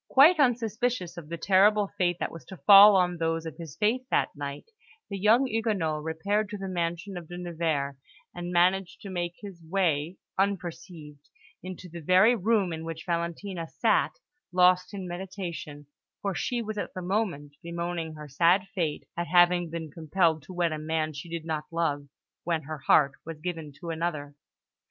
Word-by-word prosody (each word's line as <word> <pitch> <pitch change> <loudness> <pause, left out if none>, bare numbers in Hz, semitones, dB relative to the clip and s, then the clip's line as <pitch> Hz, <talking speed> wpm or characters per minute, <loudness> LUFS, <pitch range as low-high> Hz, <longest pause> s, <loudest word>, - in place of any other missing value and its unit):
Quite 310 +5 +7
unsuspicious 235 - 0
of 165 -3 -9
the 170 - -4
terrible 200 +3 +4
fate 175 -3 +1
that - - -2
was 165 -4 -10
to 190 - -10
fall 200 +7 +9
on 180 -2 +2
those 165 0 -1
of 160 - -7
his 165 -5 -9
faith 220 +4 +2
that - - +1
night, 140 -1 -6 0.5
the 200 - -3
young 225 +7 +5
Huguenot 210 -10 -1
repaired 200 +7 -1
to 210 - -5
the 195 -1 -5
mansion 175 +1 -3
of 170 -2 -8
De 175 - -8
Nevers, 160 -6 -2 0.4
and 175 0 -5
managed 180 +1 +2
to 200 - -8
make 175 -1 -3
his 195 -5 -9
way 165 -2 0 0.2
unperceived 170 -6 -4 0.3
into 185 0 -8
the 170 0 -9
very 185 +9 +5
room 205 -4 +1
in 160 0 -5
which 165 0 -6
Valentina 170 +1 -3
sat, - - +1 0.4
lost 180 0 +4
in 195 -3 -6
meditation; 175 -5 -6 0.4
for 200 -1 0
she 240 +5 -2
was 215 -1 -4
at - - -5
the 185 - -5
moment 175 -7 -2
bemoaning 170 -2 -4
her 150 -1 -9
sad 170 +7 +3
fate 160 -5 -2
at 175 0 -3
having 175 +1 +4
been 160 -2 -6
compelled 160 +1 +1
to 165 - -13
wed 175 -2 +1
a 155 - -3
man 155 0 -1
she 145 +4 -8
did 165 -1 -5
not 155 -2 -3
love, 145 -4 -1 0.4
when 165 -2 -1
her 155 +1 -6
heart 140 -3 +5
was 165 -1 -8
given 165 -3 -5
to 170 -2 -5
another. 160 -3 -3
175 Hz, 180 wpm, -28 LUFS, 160-195 Hz, 0.5 s, fall